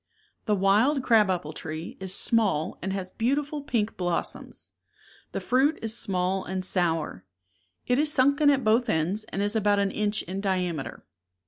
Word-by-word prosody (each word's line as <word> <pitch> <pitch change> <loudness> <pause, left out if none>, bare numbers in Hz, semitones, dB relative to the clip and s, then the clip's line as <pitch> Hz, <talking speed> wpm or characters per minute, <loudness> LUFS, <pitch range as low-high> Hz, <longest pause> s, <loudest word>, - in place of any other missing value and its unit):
The 210 - +2
wild 215 +9 +3
crab 220 -5 +4
apple 170 -4 -2
tree 155 +2 -6
is 190 -1 -3
small 195 -6 0
and 190 - -3
has 190 -1 -4
beauti 275 +6 0
ful 295 0 -6
pink 225 -6 -2
blossoms. 175 -2 -3 0.6
The - - -3
fruit 275 +5 +2
is 225 0 +1
small 185 -2 -1
and 185 0 -2
sour; 165 - 0 0.6
it 250 +2 +1
is 300 0 +2
sunken 280 +2 +4
at 275 -2 +2
both 225 +3 +3
^_. - - -3
ends, 180 +6 0
and 200 - -3
is 205 +2 +1
about 205 -1 +2
an 200 -1 +1
inch 210 0 -1
in 190 +3 -5
di 195 -2 +1
ameter. 170 -6 -4
205 Hz, 180 wpm, -26 LUFS, 185-240 Hz, 0.6 s, crab